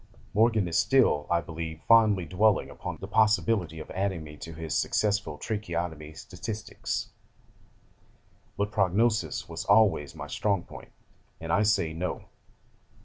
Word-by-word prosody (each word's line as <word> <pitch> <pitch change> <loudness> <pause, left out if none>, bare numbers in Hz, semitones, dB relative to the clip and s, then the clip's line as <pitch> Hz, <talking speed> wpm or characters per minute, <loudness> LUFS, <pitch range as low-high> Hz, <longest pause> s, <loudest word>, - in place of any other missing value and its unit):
Morgan 110 -2 +3
is 85 0 +1
still, 125 - +3
I 85 0 +2
believe, 80 -1 -6
fondly 110 -5 +5
dwelling 100 +4 +2
upon - - -6
the 95 - -7
possibility 105 -5 +2
of 80 - -9
adding 95 -3 -2
me 75 -1 -10
to 80 +3 -8
his 80 -1 -5
successful 105 -7 0
tracheotomy 85 -5 -4
statistics, 105 +7 -5 1.5
but 100 +1 -1
prognosis 110 +2 +1
was 85 0 -5
always 100 -9 +3
my - - -6
strong 100 -4 -1
point, - - -12 0.5
and 80 0 -3
I 105 - +4
say 100 -7 +2
No. 90 +3 -4
95 Hz, 135 wpm, -28 LUFS, 80-110 Hz, 1.5 s, fondly